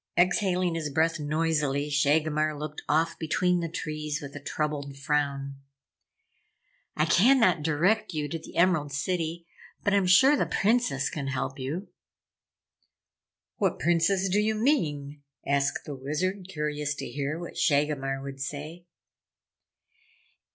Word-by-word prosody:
Exhaling 180 0 +2
his 160 -2 -2
breath 160 +3 +1
noisily, 150 -2 0
Shagomar 150 +1 +1
looked 150 0 -6
off 165 +2 +1
between 180 +3 +1
the 165 -1 -3
trees 155 -2 -4
with 140 -1 -9
a - - -5
troubled 145 -1 -3
frown. 140 -1 -1 1.4
"I 155 - +3
cannot 230 - +4
direct 165 +9 +1
you 150 -3 -2
to 165 - -4
the - - -13
Emerald 170 -5 +3
City, 165 +2 -2 0.4
but 205 - +2
I'm 200 -2 +3
sure 260 +11 +6
the - - 0
Princess 195 - +1
can 140 -3 -4
help 135 0 -3
you." 155 +10 -4 1.7
"What - - +1
Princess 175 +3 +2
do 195 +3 +2
you 215 +1 +1
mean?" 150 - 0 0.2
asked 140 0 0
the 145 - -5
Wizard, 175 +8 -3
curious 150 -3 -2
to - - -5
hear 145 +2 -3
what 175 0 -8
Shagomar 140 -2 +1
would 135 -1 -7
say. 150 +5 -6
155 Hz, 130 wpm, -27 LUFS, 145-175 Hz, 1.7 s, sure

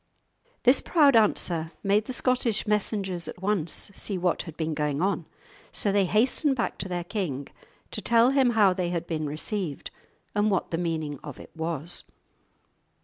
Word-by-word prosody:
This 255 +2 +5
proud 290 -6 +4
answer 170 -7 +2
made 205 +2 +2
the - - -5
Scottish 250 -4 0
messengers 200 -4 -1
at - - -8
once 190 -2 -1
see 195 0 -2
what 180 -1 0
had 165 -3 -10
been 160 -1 -1
going 150 -2 -1
on. 180 -2 0 0.4
So 205 - +2
they 200 -1 +3
hastened 255 - +2
back 235 - -2
to - - -3
their 175 -1 -2
king 170 -8 -3 0.4
to - - -4
tell 235 +2 +4
him 270 -2 +4
how 200 -3 +6
they 180 -2 -2
had 170 -1 -2
been 155 -3 -2
received 155 +1 -3 0.4
and 205 +1 +2
what 190 -3 0
the 165 - -1
meaning 160 -5 -2
of 145 - -8
it - - -12
was. 160 0 -1
185 Hz, 170 wpm, -27 LUFS, 165-215 Hz, 0.4 s, how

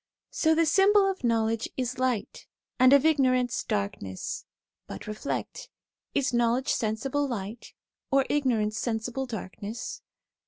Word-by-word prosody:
So 320 0 +2
the 330 +1 +3
symbol 395 +4 +5
of 385 -6 -3
knowledge 225 -1 +1
is 250 0 -2
light, 255 -5 -2 0.3
and 255 +1 +7
of 280 -1 +7
ignor 270 -5 +4
ance, 245 -1 -2
darkness; 100 -2 -3 0.4
but - - -8
reflect, 215 - -4 0.5
is 275 -3 +1
knowledge 240 +2 +2
sensible 265 +6 -1
light, 225 -2 -6 0.3
or 275 -1 +3
ignorance 230 -7 +1
sensible 240 +3 -2
darkness? 215 0 -6
250 Hz, 125 wpm, -27 LUFS, 220-280 Hz, 0.5 s, and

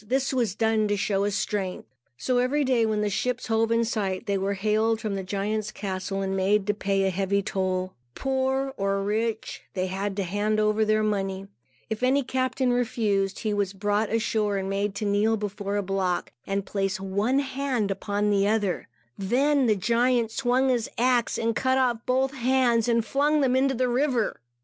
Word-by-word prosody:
This 265 +5 0
was 235 -7 0
done 220 -1 +2
to 205 0 0
show 195 0 0
his 205 -1 -1
strength. 195 -3 -3 0.3
So 250 -1 0
every 275 +4 +1
day, 250 -4 +2
when 215 -1 0
the 210 - +1
ships 250 +5 -1
hove 225 -1 +1
in 230 0 +3
sight, 195 -5 -2
they 200 - 0
were 195 +1 -1
hailed 215 +3 +1
from 215 -2 -3
the 195 - -2
giant's 210 +3 -2
castle 195 -1 -3
and 190 0 -2
made 195 +1 +2
to 205 - +1
pay 195 -1 0
heavy 195 +2 0
toll. 185 -1 -2 0.2
Poor 265 0 -1
or 195 0 0
rich, 220 +2 -2
they 185 -1 0
had 195 +2 -3
to 200 - -1
hand 205 +4 0
over 215 +1 +2
their 215 0 +2
money. 195 -2 -1 0.4
If 220 +1 -4
any 265 +2 +3
captain 255 0 0
refused, 215 -5 0
he 215 -2 -1
was 200 -1 -1
brought 205 +2 0
ashore 215 -2 0
and 190 0 -3
made 195 +1 -1
to 210 - -3
kneel 210 +2 +2
before 205 -1 -4
a 205 - 0
block 190 -2 -1 0.2
and 195 0 -1
place 195 -1 -2
one 200 +7 0
hand 265 -6 -1
upon 205 +2 -1
the 200 0 +3
other. 205 -4 0 0.3
Then 265 +7 +2
the 215 - +4
giant 235 +3 +1
swung 260 +2 +1
his 240 -3 0
axe 245 0 +2
and 230 -1 0
cut 260 +1 +2
off 240 -3 +1
both 265 +2 +1
hands, 250 -3 +2
and 230 -2 +2
flung 295 +3 +2
them 260 -2 +2
into 265 +1 +2
the 255 +1 +1
river. 250 - 0
215 Hz, 190 wpm, -26 LUFS, 195-245 Hz, 0.4 s, the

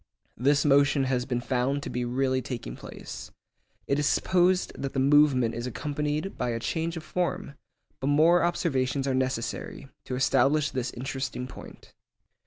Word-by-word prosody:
This 140 +4 +2
motion 140 0 +4
has 125 -2 0
been 125 -2 -1
found 130 +3 0
to - - -5
be 125 0 -2
really 130 +1 0
taking 120 - -6
place. - - -9 0.6
It 140 - +1
is 150 - +1
supposed 180 +3 +2
that 135 - -4
the 135 - 0
movement 135 -4 +4
is 120 +2 -4
accompanied 150 - -3
by 125 - 0
a 115 -1 -2
change 165 +8 -2
of 160 - -6
form, 180 -2 -2 0.5
but 135 - -2
more 160 +4 +5
observations 140 -6 0
are 135 - +1
necessary 130 +1 -3 0.2
to 130 - -3
establish 135 +3 +2
this 130 -2 -2
interesting 130 0 -4
point. 130 - -12
135 Hz, 160 wpm, -27 LUFS, 125-150 Hz, 0.6 s, more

